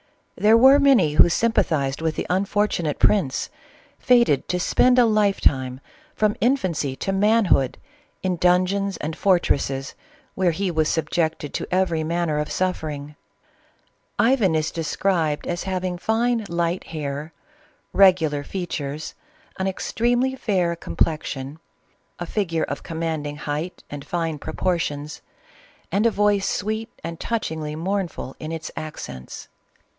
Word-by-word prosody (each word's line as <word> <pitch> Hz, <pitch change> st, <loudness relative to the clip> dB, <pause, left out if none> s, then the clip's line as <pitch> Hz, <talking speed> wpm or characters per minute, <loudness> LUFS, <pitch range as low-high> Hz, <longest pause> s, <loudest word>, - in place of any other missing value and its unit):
There 215 Hz, +2 st, +5 dB
were 265 Hz, +4 st, +7 dB
many 250 Hz, -, +4 dB
who 155 Hz, -, +6 dB
sympathized 155 Hz, -10 st, +1 dB
with 160 Hz, -1 st, -1 dB
the -, -, -3 dB
unfortunate 190 Hz, -4 st, 0 dB
prince, 180 Hz, -11 st, +2 dB, 0.5 s
fated 235 Hz, -, +3 dB
to 180 Hz, -, -1 dB
spend 250 Hz, +7 st, +3 dB
a 245 Hz, -, +6 dB
life 210 Hz, -3 st, +2 dB
time, 130 Hz, -2 st, +1 dB, 0.4 s
from 210 Hz, -1 st, +1 dB
infancy 185 Hz, -, 0 dB
to 195 Hz, -, -3 dB
man 210 Hz, +3 st, +3 dB
hood, 135 Hz, -7 st, +2 dB, 0.5 s
in 185 Hz, -2 st, 0 dB
dungeons 185 Hz, +2 st, +2 dB
and 155 Hz, +1 st, -4 dB
fortresses 140 Hz, -8 st, +1 dB, 0.4 s
where 185 Hz, -2 st, +2 dB
he 180 Hz, +3 st, -1 dB
was 155 Hz, -2 st, +1 dB
subject 160 Hz, -1 st, -1 dB
ed 145 Hz, -, -6 dB
to -, -, -3 dB
every 180 Hz, -3 st, +1 dB
manner 165 Hz, -1 st, -1 dB
of 150 Hz, -, -3 dB
suffering. 150 Hz, -5 st, -3 dB, 1.0 s
Ivan 225 Hz, -8 st, +3 dB
is 155 Hz, 0 st, 0 dB
described 165 Hz, -1 st, -1 dB
as 175 Hz, 0 st, -3 dB
having 185 Hz, -1 st, -2 dB
fine 230 Hz, +2 st, 0 dB
light 170 Hz, +1 st, -1 dB
hair, 150 Hz, 0 st, -5 dB, 0.6 s
regular 160 Hz, -7 st, +4 dB
features, 155 Hz, -5 st, -5 dB, 0.5 s
an 190 Hz, -, 0 dB
extremely 240 Hz, +6 st, 0 dB
fair 185 Hz, -9 st, 0 dB
complexion, 150 Hz, -3 st, -2 dB, 0.6 s
a 175 Hz, -, -4 dB
figure 170 Hz, -4 st, -1 dB
of 140 Hz, -, -4 dB
commanding 160 Hz, -3 st, -3 dB
height 150 Hz, +4 st, -4 dB
and 145 Hz, -1 st, -6 dB
fine 165 Hz, -2 st, -2 dB
proportions, 160 Hz, -2 st, -2 dB, 0.7 s
and 210 Hz, +4 st, +3 dB
a -, -, +5 dB
voice 205 Hz, -2 st, +2 dB
sweet 220 Hz, +2 st, -2 dB
and 165 Hz, -1 st, -6 dB
touchingly 160 Hz, -9 st, -3 dB
mournful 180 Hz, -5 st, -3 dB
in 155 Hz, -, -6 dB
its 160 Hz, -1 st, -5 dB
accents. 70 Hz, -, -7 dB
175 Hz, 130 wpm, -23 LUFS, 155-200 Hz, 1.0 s, were